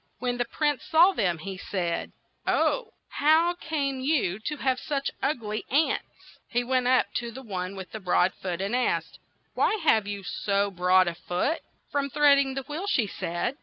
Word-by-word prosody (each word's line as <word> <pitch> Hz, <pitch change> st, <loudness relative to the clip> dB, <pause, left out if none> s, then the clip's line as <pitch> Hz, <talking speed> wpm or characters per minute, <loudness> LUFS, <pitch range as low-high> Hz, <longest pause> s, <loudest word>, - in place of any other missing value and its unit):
When 245 Hz, 0 st, -2 dB
the 240 Hz, -, 0 dB
prince 295 Hz, +3 st, -1 dB
saw 335 Hz, +4 st, +6 dB
them, 180 Hz, -, 0 dB
he 190 Hz, +4 st, -6 dB
said, 175 Hz, -4 st, -2 dB, 0.4 s
"Oh, 485 Hz, -3 st, +1 dB
how 320 Hz, +4 st, +3 dB
came 290 Hz, -6 st, -2 dB
you 260 Hz, -, +1 dB
to 300 Hz, -, -2 dB
have 260 Hz, -2 st, 0 dB
such 280 Hz, -2 st, -2 dB
ug 270 Hz, -4 st, 0 dB
ly 210 Hz, 0 st, -3 dB
aunts?" 295 Hz, +4 st, -1 dB
He 245 Hz, 0 st, +1 dB
went 255 Hz, 0 st, +1 dB
up 255 Hz, 0 st, +3 dB
to 240 Hz, -1 st, -3 dB
the 260 Hz, +3 st, -9 dB
one 190 Hz, -3 st, -4 dB
with 190 Hz, -1 st, -8 dB
the 220 Hz, -, -6 dB
broad 185 Hz, -1 st, +2 dB
foot 180 Hz, -1 st, -4 dB
and 200 Hz, +5 st, -1 dB
asked, 250 Hz, -, -1 dB, 0.3 s
"Why -, -, +2 dB
have 220 Hz, -9 st, +4 dB
you 200 Hz, -1 st, -4 dB
so 200 Hz, +1 st, 0 dB
broad 185 Hz, 0 st, +4 dB
a 170 Hz, -, 0 dB
foot?" 180 Hz, -, -2 dB, 0.3 s
"From 280 Hz, -1 st, 0 dB
treading 280 Hz, -1 st, +4 dB
the 270 Hz, -, -3 dB
wheel," 305 Hz, +8 st, -5 dB
she 260 Hz, -, +2 dB
said. 190 Hz, +7 st, -3 dB
245 Hz, 185 wpm, -27 LUFS, 195-285 Hz, 0.4 s, saw